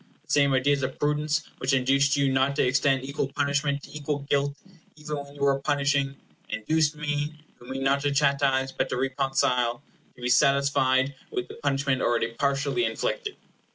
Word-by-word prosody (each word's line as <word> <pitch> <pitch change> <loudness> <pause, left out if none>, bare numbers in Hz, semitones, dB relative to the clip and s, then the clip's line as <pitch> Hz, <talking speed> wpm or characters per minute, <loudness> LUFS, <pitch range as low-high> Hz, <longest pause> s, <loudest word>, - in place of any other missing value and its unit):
The - - -10
same 140 -1 +4
ideas 140 +2 +2
of 130 0 -3
prudence 150 +1 0 0.2
which 130 +1 0
induced 135 +2 +2
you 140 -1 +2
not 135 +1 +2
to - - +2
extend 135 +1 +2
equal 140 0 -2
punishment 140 0 0
to - - -12
equal 145 -1 -3
guilt, 140 0 +1 0.4
even 150 -1 -5
when 140 0 -9
you 145 - -11
were 140 -1 +3
punishing, 140 -1 0 0.3
induced 155 +7 +1
me, 150 0 -2 0.2
who 120 - -15
mean 135 +1 -4
not 140 +1 +2
to 145 0 0
chastise, 140 -2 +2
but - - -2
to - - -2
reconcile, 130 -2 0 0.3
to 125 - -16
be - - 0
satisfied 135 0 +3 0.2
with 375 +1 -4
the - - -8
punishment 140 - 0
already 115 -1 +1
partially 140 - 0
inflicted. - - -2
140 Hz, 175 wpm, -26 LUFS, 135-145 Hz, 0.4 s, same